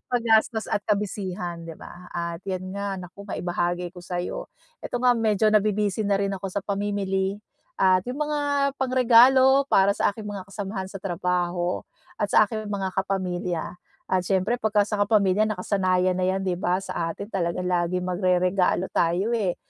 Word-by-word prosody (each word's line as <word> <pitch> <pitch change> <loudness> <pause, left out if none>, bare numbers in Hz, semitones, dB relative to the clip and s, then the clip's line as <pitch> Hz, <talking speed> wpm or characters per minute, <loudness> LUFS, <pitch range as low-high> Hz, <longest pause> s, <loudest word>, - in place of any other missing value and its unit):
Paggastos 225 -2 +2
at 205 - -1
ka-busy-han, 185 -4 -2
'di 160 - -8
ba, 180 +1 -12
at 170 -1 -4
'yan 185 0 -3
nga 200 -1 -3
naku, 185 +3 -10
maibahagi 175 0 -2
ko 180 - -11
sa'yo. 175 0 -4 0.3
Ito - - -4
nga 250 0 +4
medyo 220 -2 +1
nabi-busy 210 0 +1
na 200 - +3
rin 200 0 -1
ako 195 0 -4
sa 190 +1 -4
pamimili 200 -1 -1 0.4
at 185 -1 +4
'yong 255 +4 -5
mga 300 -1 -1 0.4
pangregalo 260 +1 +5
para 200 -6 +3
sa - - +2
aking 210 0 -8
mga 200 -2 -6
kasamahan 200 -1 -4
sa 195 - -8
trabaho 175 -1 -1 0.4
at 205 - +1
sa 215 - +6
aking 215 0 -5
mga 195 -2 -2
kapamilya. 180 -3 -2 0.4
At 185 - +3
siyempre 195 +5 +1
pagka 210 -1 +2
sa 210 0 -3
kapamilya 205 0 +3
nakasanayan 185 -2 +1
na 185 - +1
'yan, 190 +1 0
'di 180 -2 -1
ba, 180 0 +1
sa 170 -3 -3
atin 200 +2 -8
talagang 180 -1 -1
laging 180 +1 0
magreregalo 180 0 +1
tayo, 180 +7 +1
eh. 200 -7 0
195 Hz, 165 wpm, -25 LUFS, 180-210 Hz, 0.4 s, sa